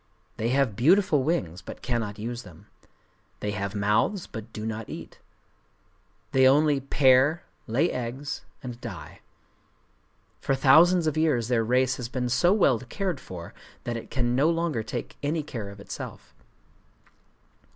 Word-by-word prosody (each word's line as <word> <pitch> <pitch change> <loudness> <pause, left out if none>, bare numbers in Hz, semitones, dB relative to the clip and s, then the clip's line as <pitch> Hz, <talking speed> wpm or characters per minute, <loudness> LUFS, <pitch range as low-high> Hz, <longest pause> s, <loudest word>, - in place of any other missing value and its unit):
They 115 - -1
have 130 -4 +2
beautiful 170 - +4
wings, 130 - -1
but - - -10
cannot 115 -5 -2
use 120 +3 -4
them. 90 -8 -15 0.7
They 105 - -2
have 100 0 -3
mouths, 105 - +1
but 110 -1 -9
do 110 0 -6
not 110 0 -4
eat. - - -9 1.1
They 130 0 +5
only 145 +1 +4
pair, 135 +3 +4 0.2
lay 135 +10 +2
eggs, 130 +4 -4 0.2
and 125 -2 -7
die. 115 -7 -8 1.2
For 135 - 0
thousands 160 +6 +6
of 155 -1 0
years 130 -8 +1
their 120 -2 +2
race 130 +2 +2
has 120 -2 -5
been 125 -1 -2
so 125 +9 +3
well 175 - +4
cared 170 - -3
for, 85 -7 -9 0.3
that 120 - -3
it 115 - -7
can 120 -2 0
no 140 +5 +4
longer 165 -7 0
take 110 - -6
any 150 +2 -1
care 115 -8 -6
of 100 0 -11
itself. 100 - -8
125 Hz, 150 wpm, -26 LUFS, 110-150 Hz, 1.2 s, thousands